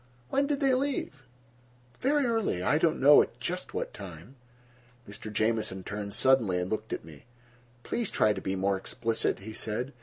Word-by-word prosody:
"When 280 +1 +1
did 290 0 -1
they 270 -2 +4
leave?" 260 - -1 0.8
"Very 285 +2 +2
early—I 195 - +1
don't 165 -1 +2
know 145 +2 +8
at 120 - -4
just 180 +9 -4
what - - -3
time." 95 - -10 0.7
Mr. 105 +1 -8
Jamieson 110 -3 0
turned 100 +1 -4
suddenly 120 -9 +3
and 90 +1 -3
looked 110 0 -3
at - - -4
me. 75 -3 -14 0.6
"Please 235 -4 -2
try 105 - +3
to - - -6
be 95 - -2
more 95 +1 +1
explicit," 115 +1 -1
he 110 +3 -8
said. 115 +6 -3
110 Hz, 170 wpm, -29 LUFS, -, 0.8 s, know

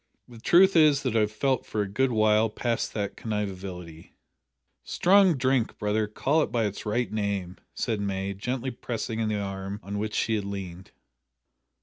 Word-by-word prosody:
The 120 -2 -13
truth 185 +9 +5
is 150 -4 +5
that 125 -4 -1
I - - +4
have 105 -1 +1
felt 130 +4 0
for 105 - -2
a - - -5
good 125 +7 0
while 110 0 +3
past 115 +2 -2
that 100 -2 -2
conviviality 95 -6 -6 0.3
" 65 +1 -56 0.2
"Strong 190 -3 +4
drink, 130 -2 +1
brother, 105 0 0
call 140 +9 +1
it - - -1
by 115 -2 +1
its 105 +1 -5
right 120 +3 0
name," 100 -4 -2 0.2
said 110 -4 -1
May, 100 0 -2
gently 125 +6 -3
pressing 115 -2 -3
the 105 -1 -1
arm 95 0 -5
on 100 +1 -4
which 105 0 -3
she 110 -1 +1
leaned. 95 -3 -6
110 Hz, 175 wpm, -27 LUFS, 100-125 Hz, 0.3 s, truth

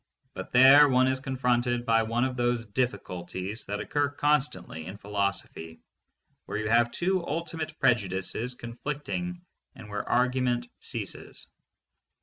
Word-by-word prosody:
But - - -7
there 135 +3 +8
one 130 0 +4
is 130 0 +1
confronted 125 -2 0
by 115 -1 +4
one 115 +2 0
of 130 -1 -1
those 120 -1 0
difficulties 100 -3 -3
that 100 +1 -3
occur 145 -1 0
constantly 145 - -1
in 95 +2 -7
philosophy, 100 -5 -3 0.7
where - - -3
you 110 0 -2
have 120 +1 +4
two 185 +6 0
ultimate 160 0 -4
prejudices 110 +3 0
conflicting 150 +9 -5 0.3
and 110 -4 -11
where 105 0 -2
argu 125 +1 +1
ment 120 -1 0
ceases. - - -6
120 Hz, 135 wpm, -28 LUFS, 105-135 Hz, 0.7 s, there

